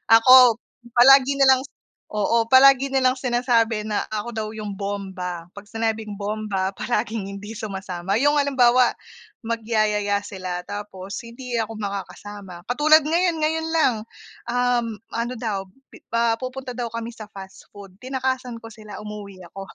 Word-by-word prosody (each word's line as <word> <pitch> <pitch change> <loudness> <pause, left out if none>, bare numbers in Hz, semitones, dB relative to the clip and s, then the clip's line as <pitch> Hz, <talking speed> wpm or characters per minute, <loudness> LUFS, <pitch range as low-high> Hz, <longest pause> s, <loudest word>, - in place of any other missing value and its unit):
Ako 250 0 +8 0.4
palagi 270 +2 +7
na 275 - +5
lang, 260 -1 +6 0.5
oo, 225 +2 +1
palagi 270 +1 +6
nilang 260 -1 +2
sinasabi 240 -4 +1
na 210 -1 -1
ako 215 +1 -4
daw 220 -1 -3
yung 210 -2 -6
bomba, 190 -4 -5
'pag 205 0 -11
sinabing 220 -2 -3
bomba 205 -2 -2
palaging 220 -1 -2
hindi 205 +2 -8
sumasama 195 -2 -3
yung 290 +1 +3
halimbawa 255 -3 +4 0.5
magyayaya 215 -3 0
sila 185 -3 -5
tapos 205 -1 -7
hindi 240 +1 -9
ako 225 -1 -2
makakasama 200 -2 -7
katulad 310 +4 +5
ngayon, 340 +2 +1
ngayon 320 +1 0
lang, 315 -6 +3 0.6
um 245 -1 +1 0.3
ano 235 +2 -2
daw, 220 -4 -2 0.5
ah, 230 0 +3
pi - - -26
pupunta 255 0 -6
daw 240 -1 -3
kami 230 0 -5
sa 215 -2 -11
fast 195 -2 -12
food 200 -2 -12
tinakasan 260 -1 -3
ko 225 - -10
sila 215 -2 -10
umuwi 205 -3 -9
ako. 195 +2 -8
225 Hz, 145 wpm, -23 LUFS, 205-255 Hz, 0.6 s, Ako